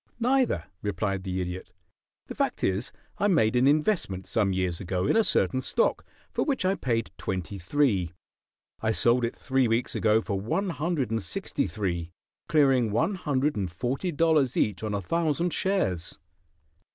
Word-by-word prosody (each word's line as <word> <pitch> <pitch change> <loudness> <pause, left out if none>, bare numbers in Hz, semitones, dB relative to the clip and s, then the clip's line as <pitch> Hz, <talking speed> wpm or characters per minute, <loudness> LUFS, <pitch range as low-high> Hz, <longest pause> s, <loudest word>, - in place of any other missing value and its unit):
"Neither," 250 - +2 0.2
replied 100 -1 -2
the 95 -1 -2
Idiot. 90 +1 -6 0.5
"The - - -7
fact - - -1
is, 95 +6 0 0.3
I 205 - +3
made 120 - +3
an 125 +2 +4
investment 150 - +1
some 105 -3 +1
years 90 -2 -1
ago 90 0 -1
in - - +2
a 225 - +5
certain 130 -9 +2
stock, 485 - +1 0.3
for - - 0
which 270 -9 0
I 190 - +3
paid 115 -10 -1
twenty 95 +1 -4
three. 100 - +1 0.7
I 110 0 +1
sold 120 +2 +3
it 115 - -1
three 130 -2 +1
weeks 115 +2 0
ago 110 0 +3
for 100 -3 -3
one 170 - -1
hundred 150 -7 -1
and 115 0 0
sixty - - -3
three, 85 -3 -3 0.4
clearing 135 -6 +4
one 160 - +1
hundred 150 -5 0
and 95 -4 -2
forty 130 - -2
dollars 155 -4 +2
each 105 -4 +1
on 105 -1 -2
a 100 - -3
thousand 170 - 0
shares." 190 - -1
115 Hz, 165 wpm, -27 LUFS, 95-155 Hz, 0.7 s, a